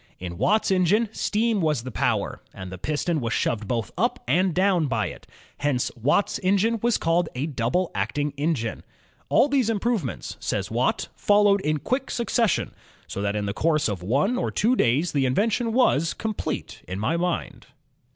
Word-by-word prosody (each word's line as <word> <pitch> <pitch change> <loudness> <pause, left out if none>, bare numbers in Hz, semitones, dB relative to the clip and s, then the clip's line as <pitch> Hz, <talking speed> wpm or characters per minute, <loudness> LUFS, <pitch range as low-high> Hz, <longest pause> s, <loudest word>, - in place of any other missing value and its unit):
In 85 -2 -7
Watt's 210 +2 +2
engine 190 +5 +3
steam 220 -1 0
was 150 -7 +1
the 130 - -6
power, - - -1
and 95 -1 -7
the 95 - -8
piston 155 - -1
was 115 0 -1
shoved 110 -3 -1
both 115 -1 -2
up - - 0
and 180 +8 +3
down 185 -2 +2
by 115 -5 0
it; - - -12 0.3
hence 145 -4 0
Watt's 140 - +1
engine 200 +5 +2
was 240 -1 +2
called 165 +1 +1
a 130 +4 -1
double 150 +5 -1
acting 145 -1 -1
engine. 140 -6 -1 0.5
"All - - +5
these 270 -5 +1
improvements," 225 -1 -2
says - - -2
Watt, - - 0
followed... 205 -1 +4
in 155 -3 0
quick 265 +1 -1
succession, 235 -4 0 0.3
so 100 - -5
that 100 0 -1
in 105 -1 -1
the 100 - -2
course 155 +5 +1
of 100 -5 -3
one 145 - +1
or - - -1
two 240 +4 +2
days 145 - +2
the 135 -3 +1
invention 225 - +1
was... 170 - +2
complete 215 -1 -4
in 95 - -4
my 110 +11 0
mind." 175 0 -3
165 Hz, 175 wpm, -25 LUFS, 125-210 Hz, 0.5 s, All